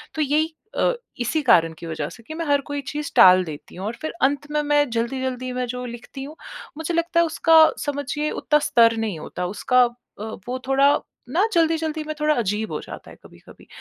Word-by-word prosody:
तो 310 Hz, -, -1 dB
यही 305 Hz, +3 st, +1 dB, 0.2 s
अ, -, -, +3 dB, 0.3 s
इसी 245 Hz, +6 st, 0 dB
कारण 165 Hz, -9 st, +4 dB
की -, -, -8 dB
वजह 155 Hz, -2 st, -4 dB
से 230 Hz, -, -14 dB
कि 315 Hz, -, -9 dB
मैं 330 Hz, 0 st, -4 dB
हर 285 Hz, -1 st, +2 dB
कोई 285 Hz, 0 st, -2 dB
चीज़ 300 Hz, 0 st, -4 dB
टाल 185 Hz, 0 st, +8 dB
देती 150 Hz, -2 st, -9 dB
हूँ 185 Hz, +3 st, -6 dB
और 220 Hz, -, -2 dB
फिर 315 Hz, -, -3 dB
अंत 285 Hz, +2 st, +1 dB
में 300 Hz, 0 st, +1 dB
मैं 290 Hz, -2 st, +2 dB
जल्दी-जल्दी 255 Hz, +2 st, -2 dB
मैं 250 Hz, 0 st, -2 dB
जो 250 Hz, +1 st, -5 dB
लिखती 240 Hz, +3 st, -8 dB
हूँ। 300 Hz, +3 st, -9 dB, 0.4 s
मुझे 320 Hz, +2 st, -3 dB
लगता 335 Hz, 0 st, +1 dB
है 340 Hz, -, +5 dB
उसका 325 Hz, 0 st, +2 dB, 0.3 s
समझिए 290 Hz, +1 st, -2 dB
उतना 300 Hz, 0 st, +1 dB
स्तर 235 Hz, -6 st, +4 dB
नहीं 220 Hz, -6 st, -2 dB
होता 180 Hz, +3 st, -5 dB
उसका 250 Hz, +6 st, +2 dB
अ, 240 Hz, -3 st, -10 dB, 0.2 s
वो 255 Hz, +1 st, -3 dB
थोड़ा 275 Hz, +1 st, +4 dB, 0.4 s
ना 365 Hz, +10 st, +2 dB
जल्दी-जल्दी 320 Hz, -2 st, +1 dB
में 310 Hz, 0 st, -4 dB
थोड़ा 300 Hz, 0 st, +2 dB
अजीब 215 Hz, -1 st, -1 dB
हो -, -, -3 dB
जाता -, -, -10 dB
है -, -, -13 dB
कभी-कभी, -, -, -17 dB
270 Hz, 210 wpm, -23 LUFS, 230-305 Hz, 0.4 s, टाल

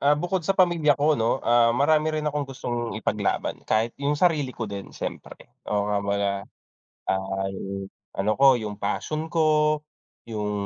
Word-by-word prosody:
Ah, 145 Hz, +1 st, +4 dB
bukod 175 Hz, +4 st, -1 dB
sa 190 Hz, +4 st, -1 dB
pamilya 170 Hz, -5 st, +4 dB
ko 150 Hz, +2 st, +3 dB
'no, 115 Hz, -4 st, +1 dB
ah, 120 Hz, 0 st, +5 dB
marami 155 Hz, +3 st, +3 dB
rin 155 Hz, -, -2 dB
akong 150 Hz, -2 st, -1 dB
gustong 120 Hz, -3 st, -4 dB
ipaglaban, -, -, -1 dB
kahit 110 Hz, +2 st, +2 dB
yung 145 Hz, +1 st, +1 dB
sarili 150 Hz, -6 st, +1 dB
ko 115 Hz, -, -2 dB
din, 100 Hz, -2 st, -6 dB
siyempre. -, -, -8 dB, 0.2 s
Oo 105 Hz, -1 st, +1 dB
nga 105 Hz, -1 st, +1 dB
'baga, 100 Hz, 0 st, 0 dB, 0.8 s
ah, 95 Hz, 0 st, -1 dB
yung 95 Hz, 0 st, -5 dB, 0.2 s
ano 100 Hz, +2 st, 0 dB
ko, 135 Hz, -2 st, +6 dB
yung 105 Hz, -2 st, -5 dB
passion 155 Hz, -, -3 dB
ko, 155 Hz, -2 st, +3 dB, 0.5 s
yung, 105 Hz, -2 st, -3 dB
130 Hz, 165 wpm, -25 LUFS, 105-155 Hz, 0.8 s, ko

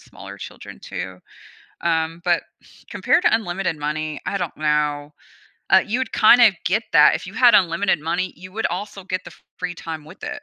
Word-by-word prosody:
smaller -, -, -12 dB
children -, -, -10 dB
too, 95 Hz, -1 st, -7 dB, 0.6 s
um, 165 Hz, 0 st, -1 dB
but 175 Hz, -2 st, +1 dB, 0.5 s
compared -, -, +2 dB
to -, -, +4 dB
unlimited 190 Hz, -5 st, -2 dB
money, 150 Hz, 0 st, -4 dB
I 200 Hz, +2 st, -1 dB
don't 175 Hz, -4 st, -4 dB
know, 150 Hz, -1 st, 0 dB, 0.6 s
uh, -, -, +6 dB
you 230 Hz, +3 st, -2 dB
would 260 Hz, -, -4 dB
kinda 230 Hz, 0 st, +6 dB
get 215 Hz, +6 st, +1 dB
that 150 Hz, -2 st, +7 dB
if -, -, -5 dB
you 180 Hz, -, -9 dB
had 245 Hz, 0 st, +6 dB
unlimited 185 Hz, +2 st, +3 dB
money, 175 Hz, +4 st, -2 dB
you 185 Hz, +1 st, -12 dB
would 225 Hz, +3 st, -1 dB
also 195 Hz, +2 st, -6 dB
get 185 Hz, 0 st, -4 dB
the -, -, -10 dB
fr -, -, -21 dB, 0.2 s
free 175 Hz, 0 st, -4 dB
time 160 Hz, -2 st, -7 dB
with 155 Hz, +5 st, -15 dB
it 290 Hz, -1 st, -6 dB
175 Hz, 190 wpm, -21 LUFS, 155-200 Hz, 0.6 s, that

